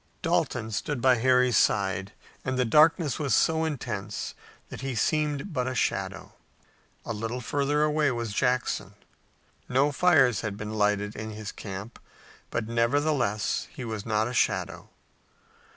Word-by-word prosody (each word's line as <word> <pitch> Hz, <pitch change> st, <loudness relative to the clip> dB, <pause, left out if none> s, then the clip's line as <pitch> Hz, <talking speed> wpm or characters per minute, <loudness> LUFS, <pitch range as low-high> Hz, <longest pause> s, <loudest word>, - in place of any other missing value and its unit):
Dalton 110 Hz, -, 0 dB
stood 135 Hz, +6 st, -2 dB
by 130 Hz, 0 st, +4 dB
Harry's 125 Hz, 0 st, +3 dB
side, 95 Hz, -2 st, +1 dB, 0.3 s
and 130 Hz, 0 st, -2 dB
the 125 Hz, -, +2 dB
darkness 155 Hz, +3 st, +4 dB
was 140 Hz, -8 st, +1 dB
so 160 Hz, 0 st, +2 dB
intense 150 Hz, -5 st, -4 dB, 0.4 s
that -, -, -8 dB
he 135 Hz, -2 st, -3 dB
seemed 150 Hz, -, 0 dB
but 125 Hz, -3 st, -1 dB
a 130 Hz, -, -3 dB
shadow. 95 Hz, -4 st, -2 dB, 0.7 s
A 115 Hz, -, -3 dB
little 115 Hz, +3 st, -4 dB
further 145 Hz, +4 st, 0 dB
away 150 Hz, -1 st, +2 dB
was 120 Hz, -4 st, -3 dB
Jackson. 120 Hz, -5 st, 0 dB, 0.7 s
No 135 Hz, +3 st, +3 dB
fires 135 Hz, -, +4 dB
had 105 Hz, -2 st, -4 dB
been 110 Hz, 0 st, -5 dB
lighted 105 Hz, -1 st, 0 dB
in 110 Hz, +1 st, -5 dB
his 105 Hz, -1 st, -6 dB
camp, 100 Hz, +3 st, -8 dB, 0.5 s
but 110 Hz, -, -2 dB
nevertheless 115 Hz, -2 st, 0 dB
he 130 Hz, -, -8 dB
was 110 Hz, -3 st, -4 dB
not 110 Hz, 0 st, 0 dB
a 125 Hz, -, -5 dB
shadow. -, -, 0 dB
120 Hz, 145 wpm, -27 LUFS, 110-140 Hz, 0.7 s, by